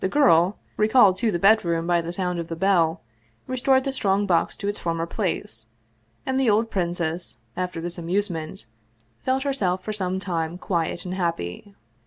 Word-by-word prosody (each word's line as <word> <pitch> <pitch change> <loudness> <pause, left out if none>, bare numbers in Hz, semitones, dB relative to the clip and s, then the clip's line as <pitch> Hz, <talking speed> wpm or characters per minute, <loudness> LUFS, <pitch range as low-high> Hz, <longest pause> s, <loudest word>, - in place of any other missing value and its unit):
The 190 - 0
girl, 190 - +4 0.2
re 215 - +3
called 210 -5 +6
to 225 +4 +1
the 185 - 0
bedroom 170 -4 +3
by 175 0 +2
the 165 +1 -5
sound 180 -1 -2
of 165 - -4
the 165 - -4
bell, 165 -2 +2 0.4
restored 260 +1 +2
the 275 -1 -2
strong 200 -5 +1
box 170 -4 +1
to 200 - -4
its 205 0 -2
former 165 -1 -1
place, 165 - -3 0.6
and 265 0 0
the 260 -4 +3
old 220 +2 +2
princess, 170 -5 -2 0.2
after 180 -1 -3
this 175 +1 -4
amusement, 175 -1 -2 0.6
felt 260 +1 +1
herself 190 -10 0
for 215 - -3
some 190 -2 -1
time 170 -3 -2
quiet 170 -2 -2
and 180 - -4
happy. 170 - -3
185 Hz, 180 wpm, -24 LUFS, 170-210 Hz, 0.6 s, called